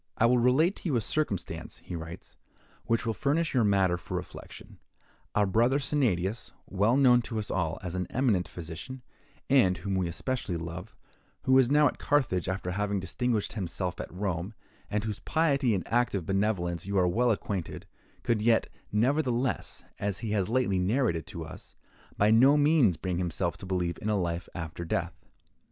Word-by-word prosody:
"I 115 - +4
will 125 +1 +4
relate 140 - +3
to 175 - -3
you 140 - +1
a 115 - +2
circumstance," 110 - -2
he 90 - -8
writes, 80 +2 -8 0.5
"which 115 0 0
will 115 - 0
furnish 145 - 0
you 125 -3 +3
matter 95 -4 +3
for 85 - -5
reflection. - - -9 0.6
Our 105 - +4
brother 115 +7 +3
Sennadius, 105 - 0
well 105 +6 +2
known 125 -3 +6
to 115 -1 -5
us 105 - -3
all 80 -4 -1
as 90 -2 -4
an 90 -1 -2
eminent 115 -9 +1
physician, 85 +10 -8 0.4
and 115 -10 +4
whom 95 +3 -4
we 95 -2 +1
especially 90 +1 -2
love, 85 +5 -7 0.5
who 130 - +4
is 125 -2 +4
now 150 +1 +5
at - - -4
Carthage, 120 - +1
after 95 -1 -2
having 100 +1 -1
distinguished 110 +4 -1
himself 90 -3 -3
at - - -8
Rome, 95 +2 -3 0.3
and 105 0 -1
with - - -3
whose 105 - -4
piety 140 -8 +2
and 95 - -3
active 115 -7 +1
benevolence 95 -3 -1
you 100 0 -1
are 90 -1 +4
well 120 +7 +2
acquainted, 100 -5 -3 0.4
could 115 -3 +1
yet, 115 +1 +3 0.2
nevertheless, 125 +2 0 0.2
as 100 -1 -1
he 110 -3 -3
has 100 -3 0
lately 115 -6 +1
narrated 95 - +1
to 85 -5 -6
us, 75 - -11 0.4
by 105 +1 +4
no 130 +6 +6
means 145 - +4
bring 90 -2 -2
himself 85 -1 -1
to 95 - -9
believe 90 -2 -1
in 105 - -2
a 105 -2 +2
life 85 -1 -2
after 85 0 -5
death. 80 - -2
105 Hz, 180 wpm, -29 LUFS, 90-125 Hz, 0.6 s, known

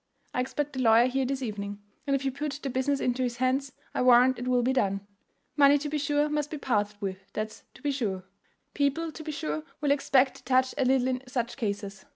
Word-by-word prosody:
I - - -1
expect 295 +3 -3
the 260 - -2
lawyer 230 0 +6
here 265 +1 0
this 270 0 -2
evening, 205 -3 -4 0.3
and 275 - +3
if 275 0 -2
you 270 - +1
put 285 +2 -3
the 275 - -2
business 275 +2 0
into 250 +1 0
his 245 -2 -1
hands 260 +2 0 0.2
I - - 0
warrant 250 0 +6
it 245 - -4
will 250 -1 +3
be 260 +2 +2
done. 200 -6 0 0.5
Money 285 0 +6
to 295 +1 -4
be 300 0 -1
sure 290 +1 +1
must 295 -1 -1
be 305 - -5
parted 210 -6 -1
with, 195 -1 -6
that's 215 0 -4
to - - -16
be 290 - +1
sure. 205 -9 -2 0.5
People 295 +3 0
to 315 - -9
be 310 - -4
sure 155 - -3 0.2
will 290 -2 +1
expect 270 -2 +3
to - - -18
touch 255 0 +2
a 265 - +3
little 260 0 +3
in 255 -1 -1
such 240 -2 -2
cases. 200 -5 -4
255 Hz, 230 wpm, -28 LUFS, 230-280 Hz, 0.5 s, lawyer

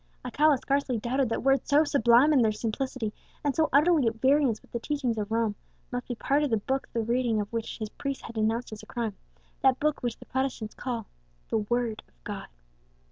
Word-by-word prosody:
Alcala 300 -1 +3
scarcely 275 -1 0
doubted 250 +3 0
that 230 - -2
words 270 0 +2
so 295 +2 +6
sublime 275 0 +5
in 270 - +5
their 220 -2 +4
simplicity, 225 +1 -3 0.3
and 285 -2 0
so 320 -1 +2
utterly 300 -2 +4
at 225 - 0
variance 265 -1 +3
with - - -24
the 235 - -2
teachings 265 -3 -1
of 210 -1 -3
Rome, 225 -2 +1 0.4
must 245 0 -4
be 245 - -3
part 280 +5 +1
of 295 - +1
the 225 - +2
Book 265 +6 -2
the 230 - 0
reading 235 -1 +1
of 205 +2 -4
which 230 -1 -3
his 215 -2 -4
priest 275 +4 -5
had 230 - -8
denounced 225 +1 -1
as 210 - -8
a - - -14
crime; 230 -4 -3 0.5
that 260 -1 +4
Book 305 0 0
which 240 -2 -2
the - - -13
Protestants 260 -4 -2
call 235 -4 -4 0.4
the 225 - +1
WORD 230 0 -1
OF - - -35
GOD. - - -6
245 Hz, 215 wpm, -28 LUFS, 225-275 Hz, 0.5 s, so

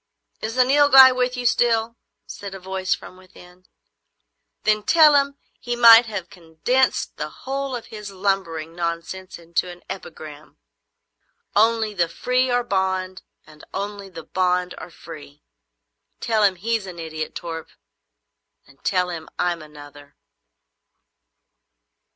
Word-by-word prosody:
"Is 225 +2 -4
the 255 - +5
Nilghai 270 -1 +7
with 250 0 0
you 250 - -4
still?" 230 -1 +2 0.3
said 200 -1 -8
a - - -8
voice 190 0 -2
from 185 - -13
within. 185 0 -18 1.0
"Then 215 0 +2
tell 305 +7 +6
him 280 0 +2 0.2
he 240 0 -3
might 230 0 +8
have 190 -5 -6
condensed 180 +10 -1
the 150 - -4
whole 270 - -4
of 240 - -7
his 210 -1 -7
lumbering 185 -5 -2
nonsense 170 +2 -5
into 170 +1 -2
an 175 0 -12
epigram: 155 -5 -10 1.0
"Only 220 0 +3
the 175 -4 0
free 250 +8 0
are 245 0 +1
bond, 190 -3 -2 0.2
and 155 -1 -17
only 200 0 -5
the 165 -3 -10
bond 180 +1 0
are 160 - -9
free." 150 -3 -13 0.8
Tell 220 -2 0
him 195 -2 +4
he's 220 +2 -2
an 180 -2 -9
idiot, 160 -1 -6
Torp, 165 -1 -6 1.0
and 140 0 -23
tell 180 -2 0
him 160 -2 -7
I'm 175 -2 -1
another." 145 -1 -14
190 Hz, 135 wpm, -22 LUFS, 170-230 Hz, 1.0 s, might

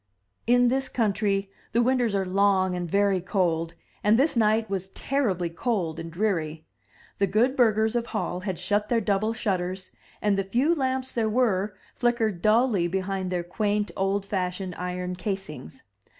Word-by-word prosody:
In 245 0 +5
this 265 +1 0
country 200 -3 0 0.2
the 235 - +4
winters 245 -4 +2
are 195 -1 +1
long 190 0 +2
and 175 -1 -3
very 200 0 +2
cold, 170 -3 0 0.3
and 210 +2 +5
this 280 +4 +2
night 220 0 +3
was 190 -1 -3
terribly 200 -9 -1
cold 180 -4 -2
and 165 0 -6
dreary. 165 -5 -1 0.5
The 200 - +3
good 230 +8 +2
burghers 220 -2 +3
of 235 -1 0
Hall 210 -5 -2
had 185 -2 -4
shut 205 +4 0
their 235 - +3
double 210 +1 0
shutters, 185 -3 -2 0.3
and 205 -2 +1
the - - +1
few 245 - +2
lamps 260 -3 -1
there 225 -2 0
were, 210 -4 +1 0.2
flickered 225 -7 0
dully 215 -4 +3
behind 190 +1 -2
their 180 -1 -1
quaint, 205 +3 -1
old 195 +1 0
fashioned 185 -1 -3
iron 180 +1 -4
casings. 180 - -5
200 Hz, 160 wpm, -26 LUFS, 185-225 Hz, 0.5 s, In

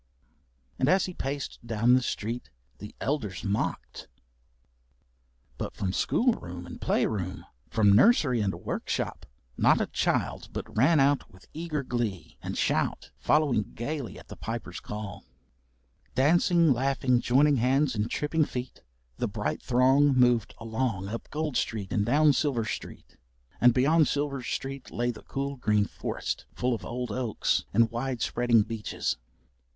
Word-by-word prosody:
And 130 - +2
as 185 0 +4
he 185 - -6
paced 140 -2 -4
down 115 +1 +2
the 130 - +5
streets 120 0 -4 0.3
the 105 - -9
elders 110 - -2
mocked, 100 0 -3 1.5
but - - -4
from 95 -2 -2
school 245 - +2
room 90 - -8
and 85 - -10
play - - +2
room, 95 -4 -3 0.2
from 105 -2 +4
nursery 130 - +5
and 100 -2 0
workshop, - - -3 0.3
not - - +4
a - - +1
child - - -1
but - - -7
ran 140 +8 +4
out 140 +1 +2
with 95 0 -18
eager 155 -2 -3
glee 115 -9 -3
and - - -5
shout - - 0
following 140 -9 +2
gaily 130 -1 -4
at - - -13
the - - -9
Piper's - - -5
call. 105 -1 -7 0.9
Dancing, 165 +3 +4
laughing, 130 0 +1
joining 140 +3 +4
hands 130 +3 +2
and 105 +1 -1
tripping 155 +4 +1
feet, 125 -1 -6 0.4
the - - -1
bright - - -3
throng 130 +3 +4
moved 120 -4 +3
along 115 -4 -2
up 115 +2 -6
Gold 150 -2 -3
Street 105 -4 -2
and 105 - +2
down 145 +6 +4
Silver 130 -6 0
Street, - - -7 0.4
and 125 - +7
beyond 150 +6 +4
Silver 140 -2 -1
Street 135 +2 -5
lay 120 +1 -1
the 110 - -11
cool 140 0 -4
green 105 -4 +2
forest - - -4
full 125 0 0
of 115 - -4
old 125 -1 -4
oaks 120 -1 0
and 115 +2 +3
wide 120 0 -2
spreading 120 -3 +3
beeches. 110 - -3
125 Hz, 150 wpm, -28 LUFS, 110-140 Hz, 1.5 s, and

